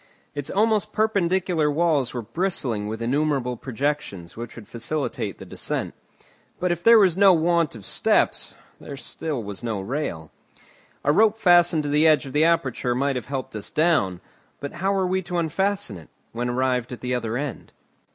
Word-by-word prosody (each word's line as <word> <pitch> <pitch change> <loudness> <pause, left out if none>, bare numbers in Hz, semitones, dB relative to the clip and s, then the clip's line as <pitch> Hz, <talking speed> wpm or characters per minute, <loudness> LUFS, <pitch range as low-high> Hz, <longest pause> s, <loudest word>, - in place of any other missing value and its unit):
Its 145 -1 -4
almost 215 0 +1
perpendicular 185 -6 +1
walls 150 -4 +1
were 120 -2 -4
bristling 125 - -2
with 110 +2 -4
innumerable 135 -1 0
projections 130 -9 -3
which 120 +1 -7
would 115 -3 -11
facilitate 140 +6 -3
the - - -10
descent. - - -3 0.7
But 180 0 +1
if 175 0 -2
there 230 0 +8
was 190 -5 +4
no 195 -2 +7
want 170 -3 +2
of 105 -4 -10
steps, - - +1 0.4
still 145 +4 -5
there 115 - -5
was 100 0 -6
no 115 -4 -2
rail. 95 - -4 0.7
A 145 - +3
rope 220 +4 +4
fastened 175 -5 +4
to 145 - -3
the 150 +2 +4
edge 155 -2 +4
of 135 - -8
the 150 +2 +4
aperture 130 -7 +1
might 140 +1 0
have 125 - -4
helped 135 -5 -5
us 105 - -5
down. 125 - +1 0.4
But 140 - -5
how 190 +3 -1
were 195 -1 +1
we 185 +1 0
to 175 -1 -4
unfasten 180 - -1
it, 80 - -16 0.2
when 120 +1 -2
arrived 125 0 0
at 125 - -7
the 125 0 -2
other 115 -2 -2
end? 140 -5 -5
145 Hz, 180 wpm, -24 LUFS, 120-175 Hz, 0.7 s, there